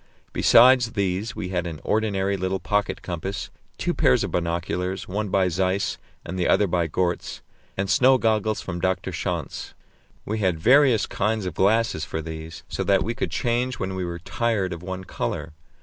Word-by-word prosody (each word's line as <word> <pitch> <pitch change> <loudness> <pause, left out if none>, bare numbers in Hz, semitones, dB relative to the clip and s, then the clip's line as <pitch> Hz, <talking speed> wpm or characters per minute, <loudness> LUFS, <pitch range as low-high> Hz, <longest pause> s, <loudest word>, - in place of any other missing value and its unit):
Besides 125 -1 +6
these 100 +1 -1
we 90 - -4
had 90 -2 -1
an 80 -3 -6
ordinary 100 -2 0
little 95 0 -1
pocket 105 0 -1
compass, 90 +3 -4 0.3
two - - -1
pairs 65 - +3
of - - -3
binoculars, 90 +2 -2
one 105 +2 -2
by 95 0 +2
Zeiss 95 +3 0 0.3
and 95 +2 -5
the 90 - +1
other 105 - +4
by 85 -3 0
Goertz, 85 +2 -2 0.3
and 100 +1 0
snow 130 +4 +5
goggles 110 -2 +1
from 90 -2 -5
Dr. 95 +1 0
Schanz. 85 -2 -4 0.5
We 110 +1 -2
had 95 -5 +1
various 125 - +5
kinds 105 0 -1
of 90 - -3
glasses 100 -3 +2
for 80 - -4
these, 80 0 -7
so - - -3
that 100 -1 +3
we 115 - -2
could - - -2
change 125 +2 -1
when 95 - -3
we 95 -1 -3
were 85 -1 -4
tired 100 +1 -1
of 85 - -7
one 95 +1 -5
colour. 80 -1 -4
95 Hz, 180 wpm, -24 LUFS, 90-110 Hz, 0.5 s, Besides